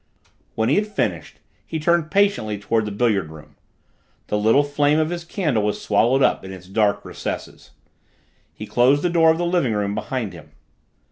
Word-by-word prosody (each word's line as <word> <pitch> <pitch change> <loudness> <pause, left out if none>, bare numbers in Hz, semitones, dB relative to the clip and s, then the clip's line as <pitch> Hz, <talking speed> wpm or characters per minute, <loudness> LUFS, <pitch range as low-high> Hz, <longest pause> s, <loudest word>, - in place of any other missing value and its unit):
When 110 0 0
he - - +3
had 210 +1 +1
finished 210 - -3 0.2
he 160 - -5
turned 165 0 +1
patiently 200 - +1
toward 110 +2 -1
the 105 - -4
billiard 100 -6 0
room 80 -1 -14 0.7
the 105 - 0
little 110 +7 +4
flame 145 +1 +1
of 155 +1 0
his 175 -1 -4
candle 160 - -1
was 105 0 -1
swallowed 120 +6 +2
up - - +2
in 95 - -8
its 90 -1 -11
dark 100 +1 0
recesses - - -7 0.8
he 105 - -9
closed 130 +6 +3
the 175 - +1
door 165 -1 +4
of 160 - +3
the 175 - -1
living 170 -9 +1
room 100 -1 -1
behind 110 -1 -4
him. 85 -3 -14
125 Hz, 185 wpm, -21 LUFS, 105-160 Hz, 0.8 s, little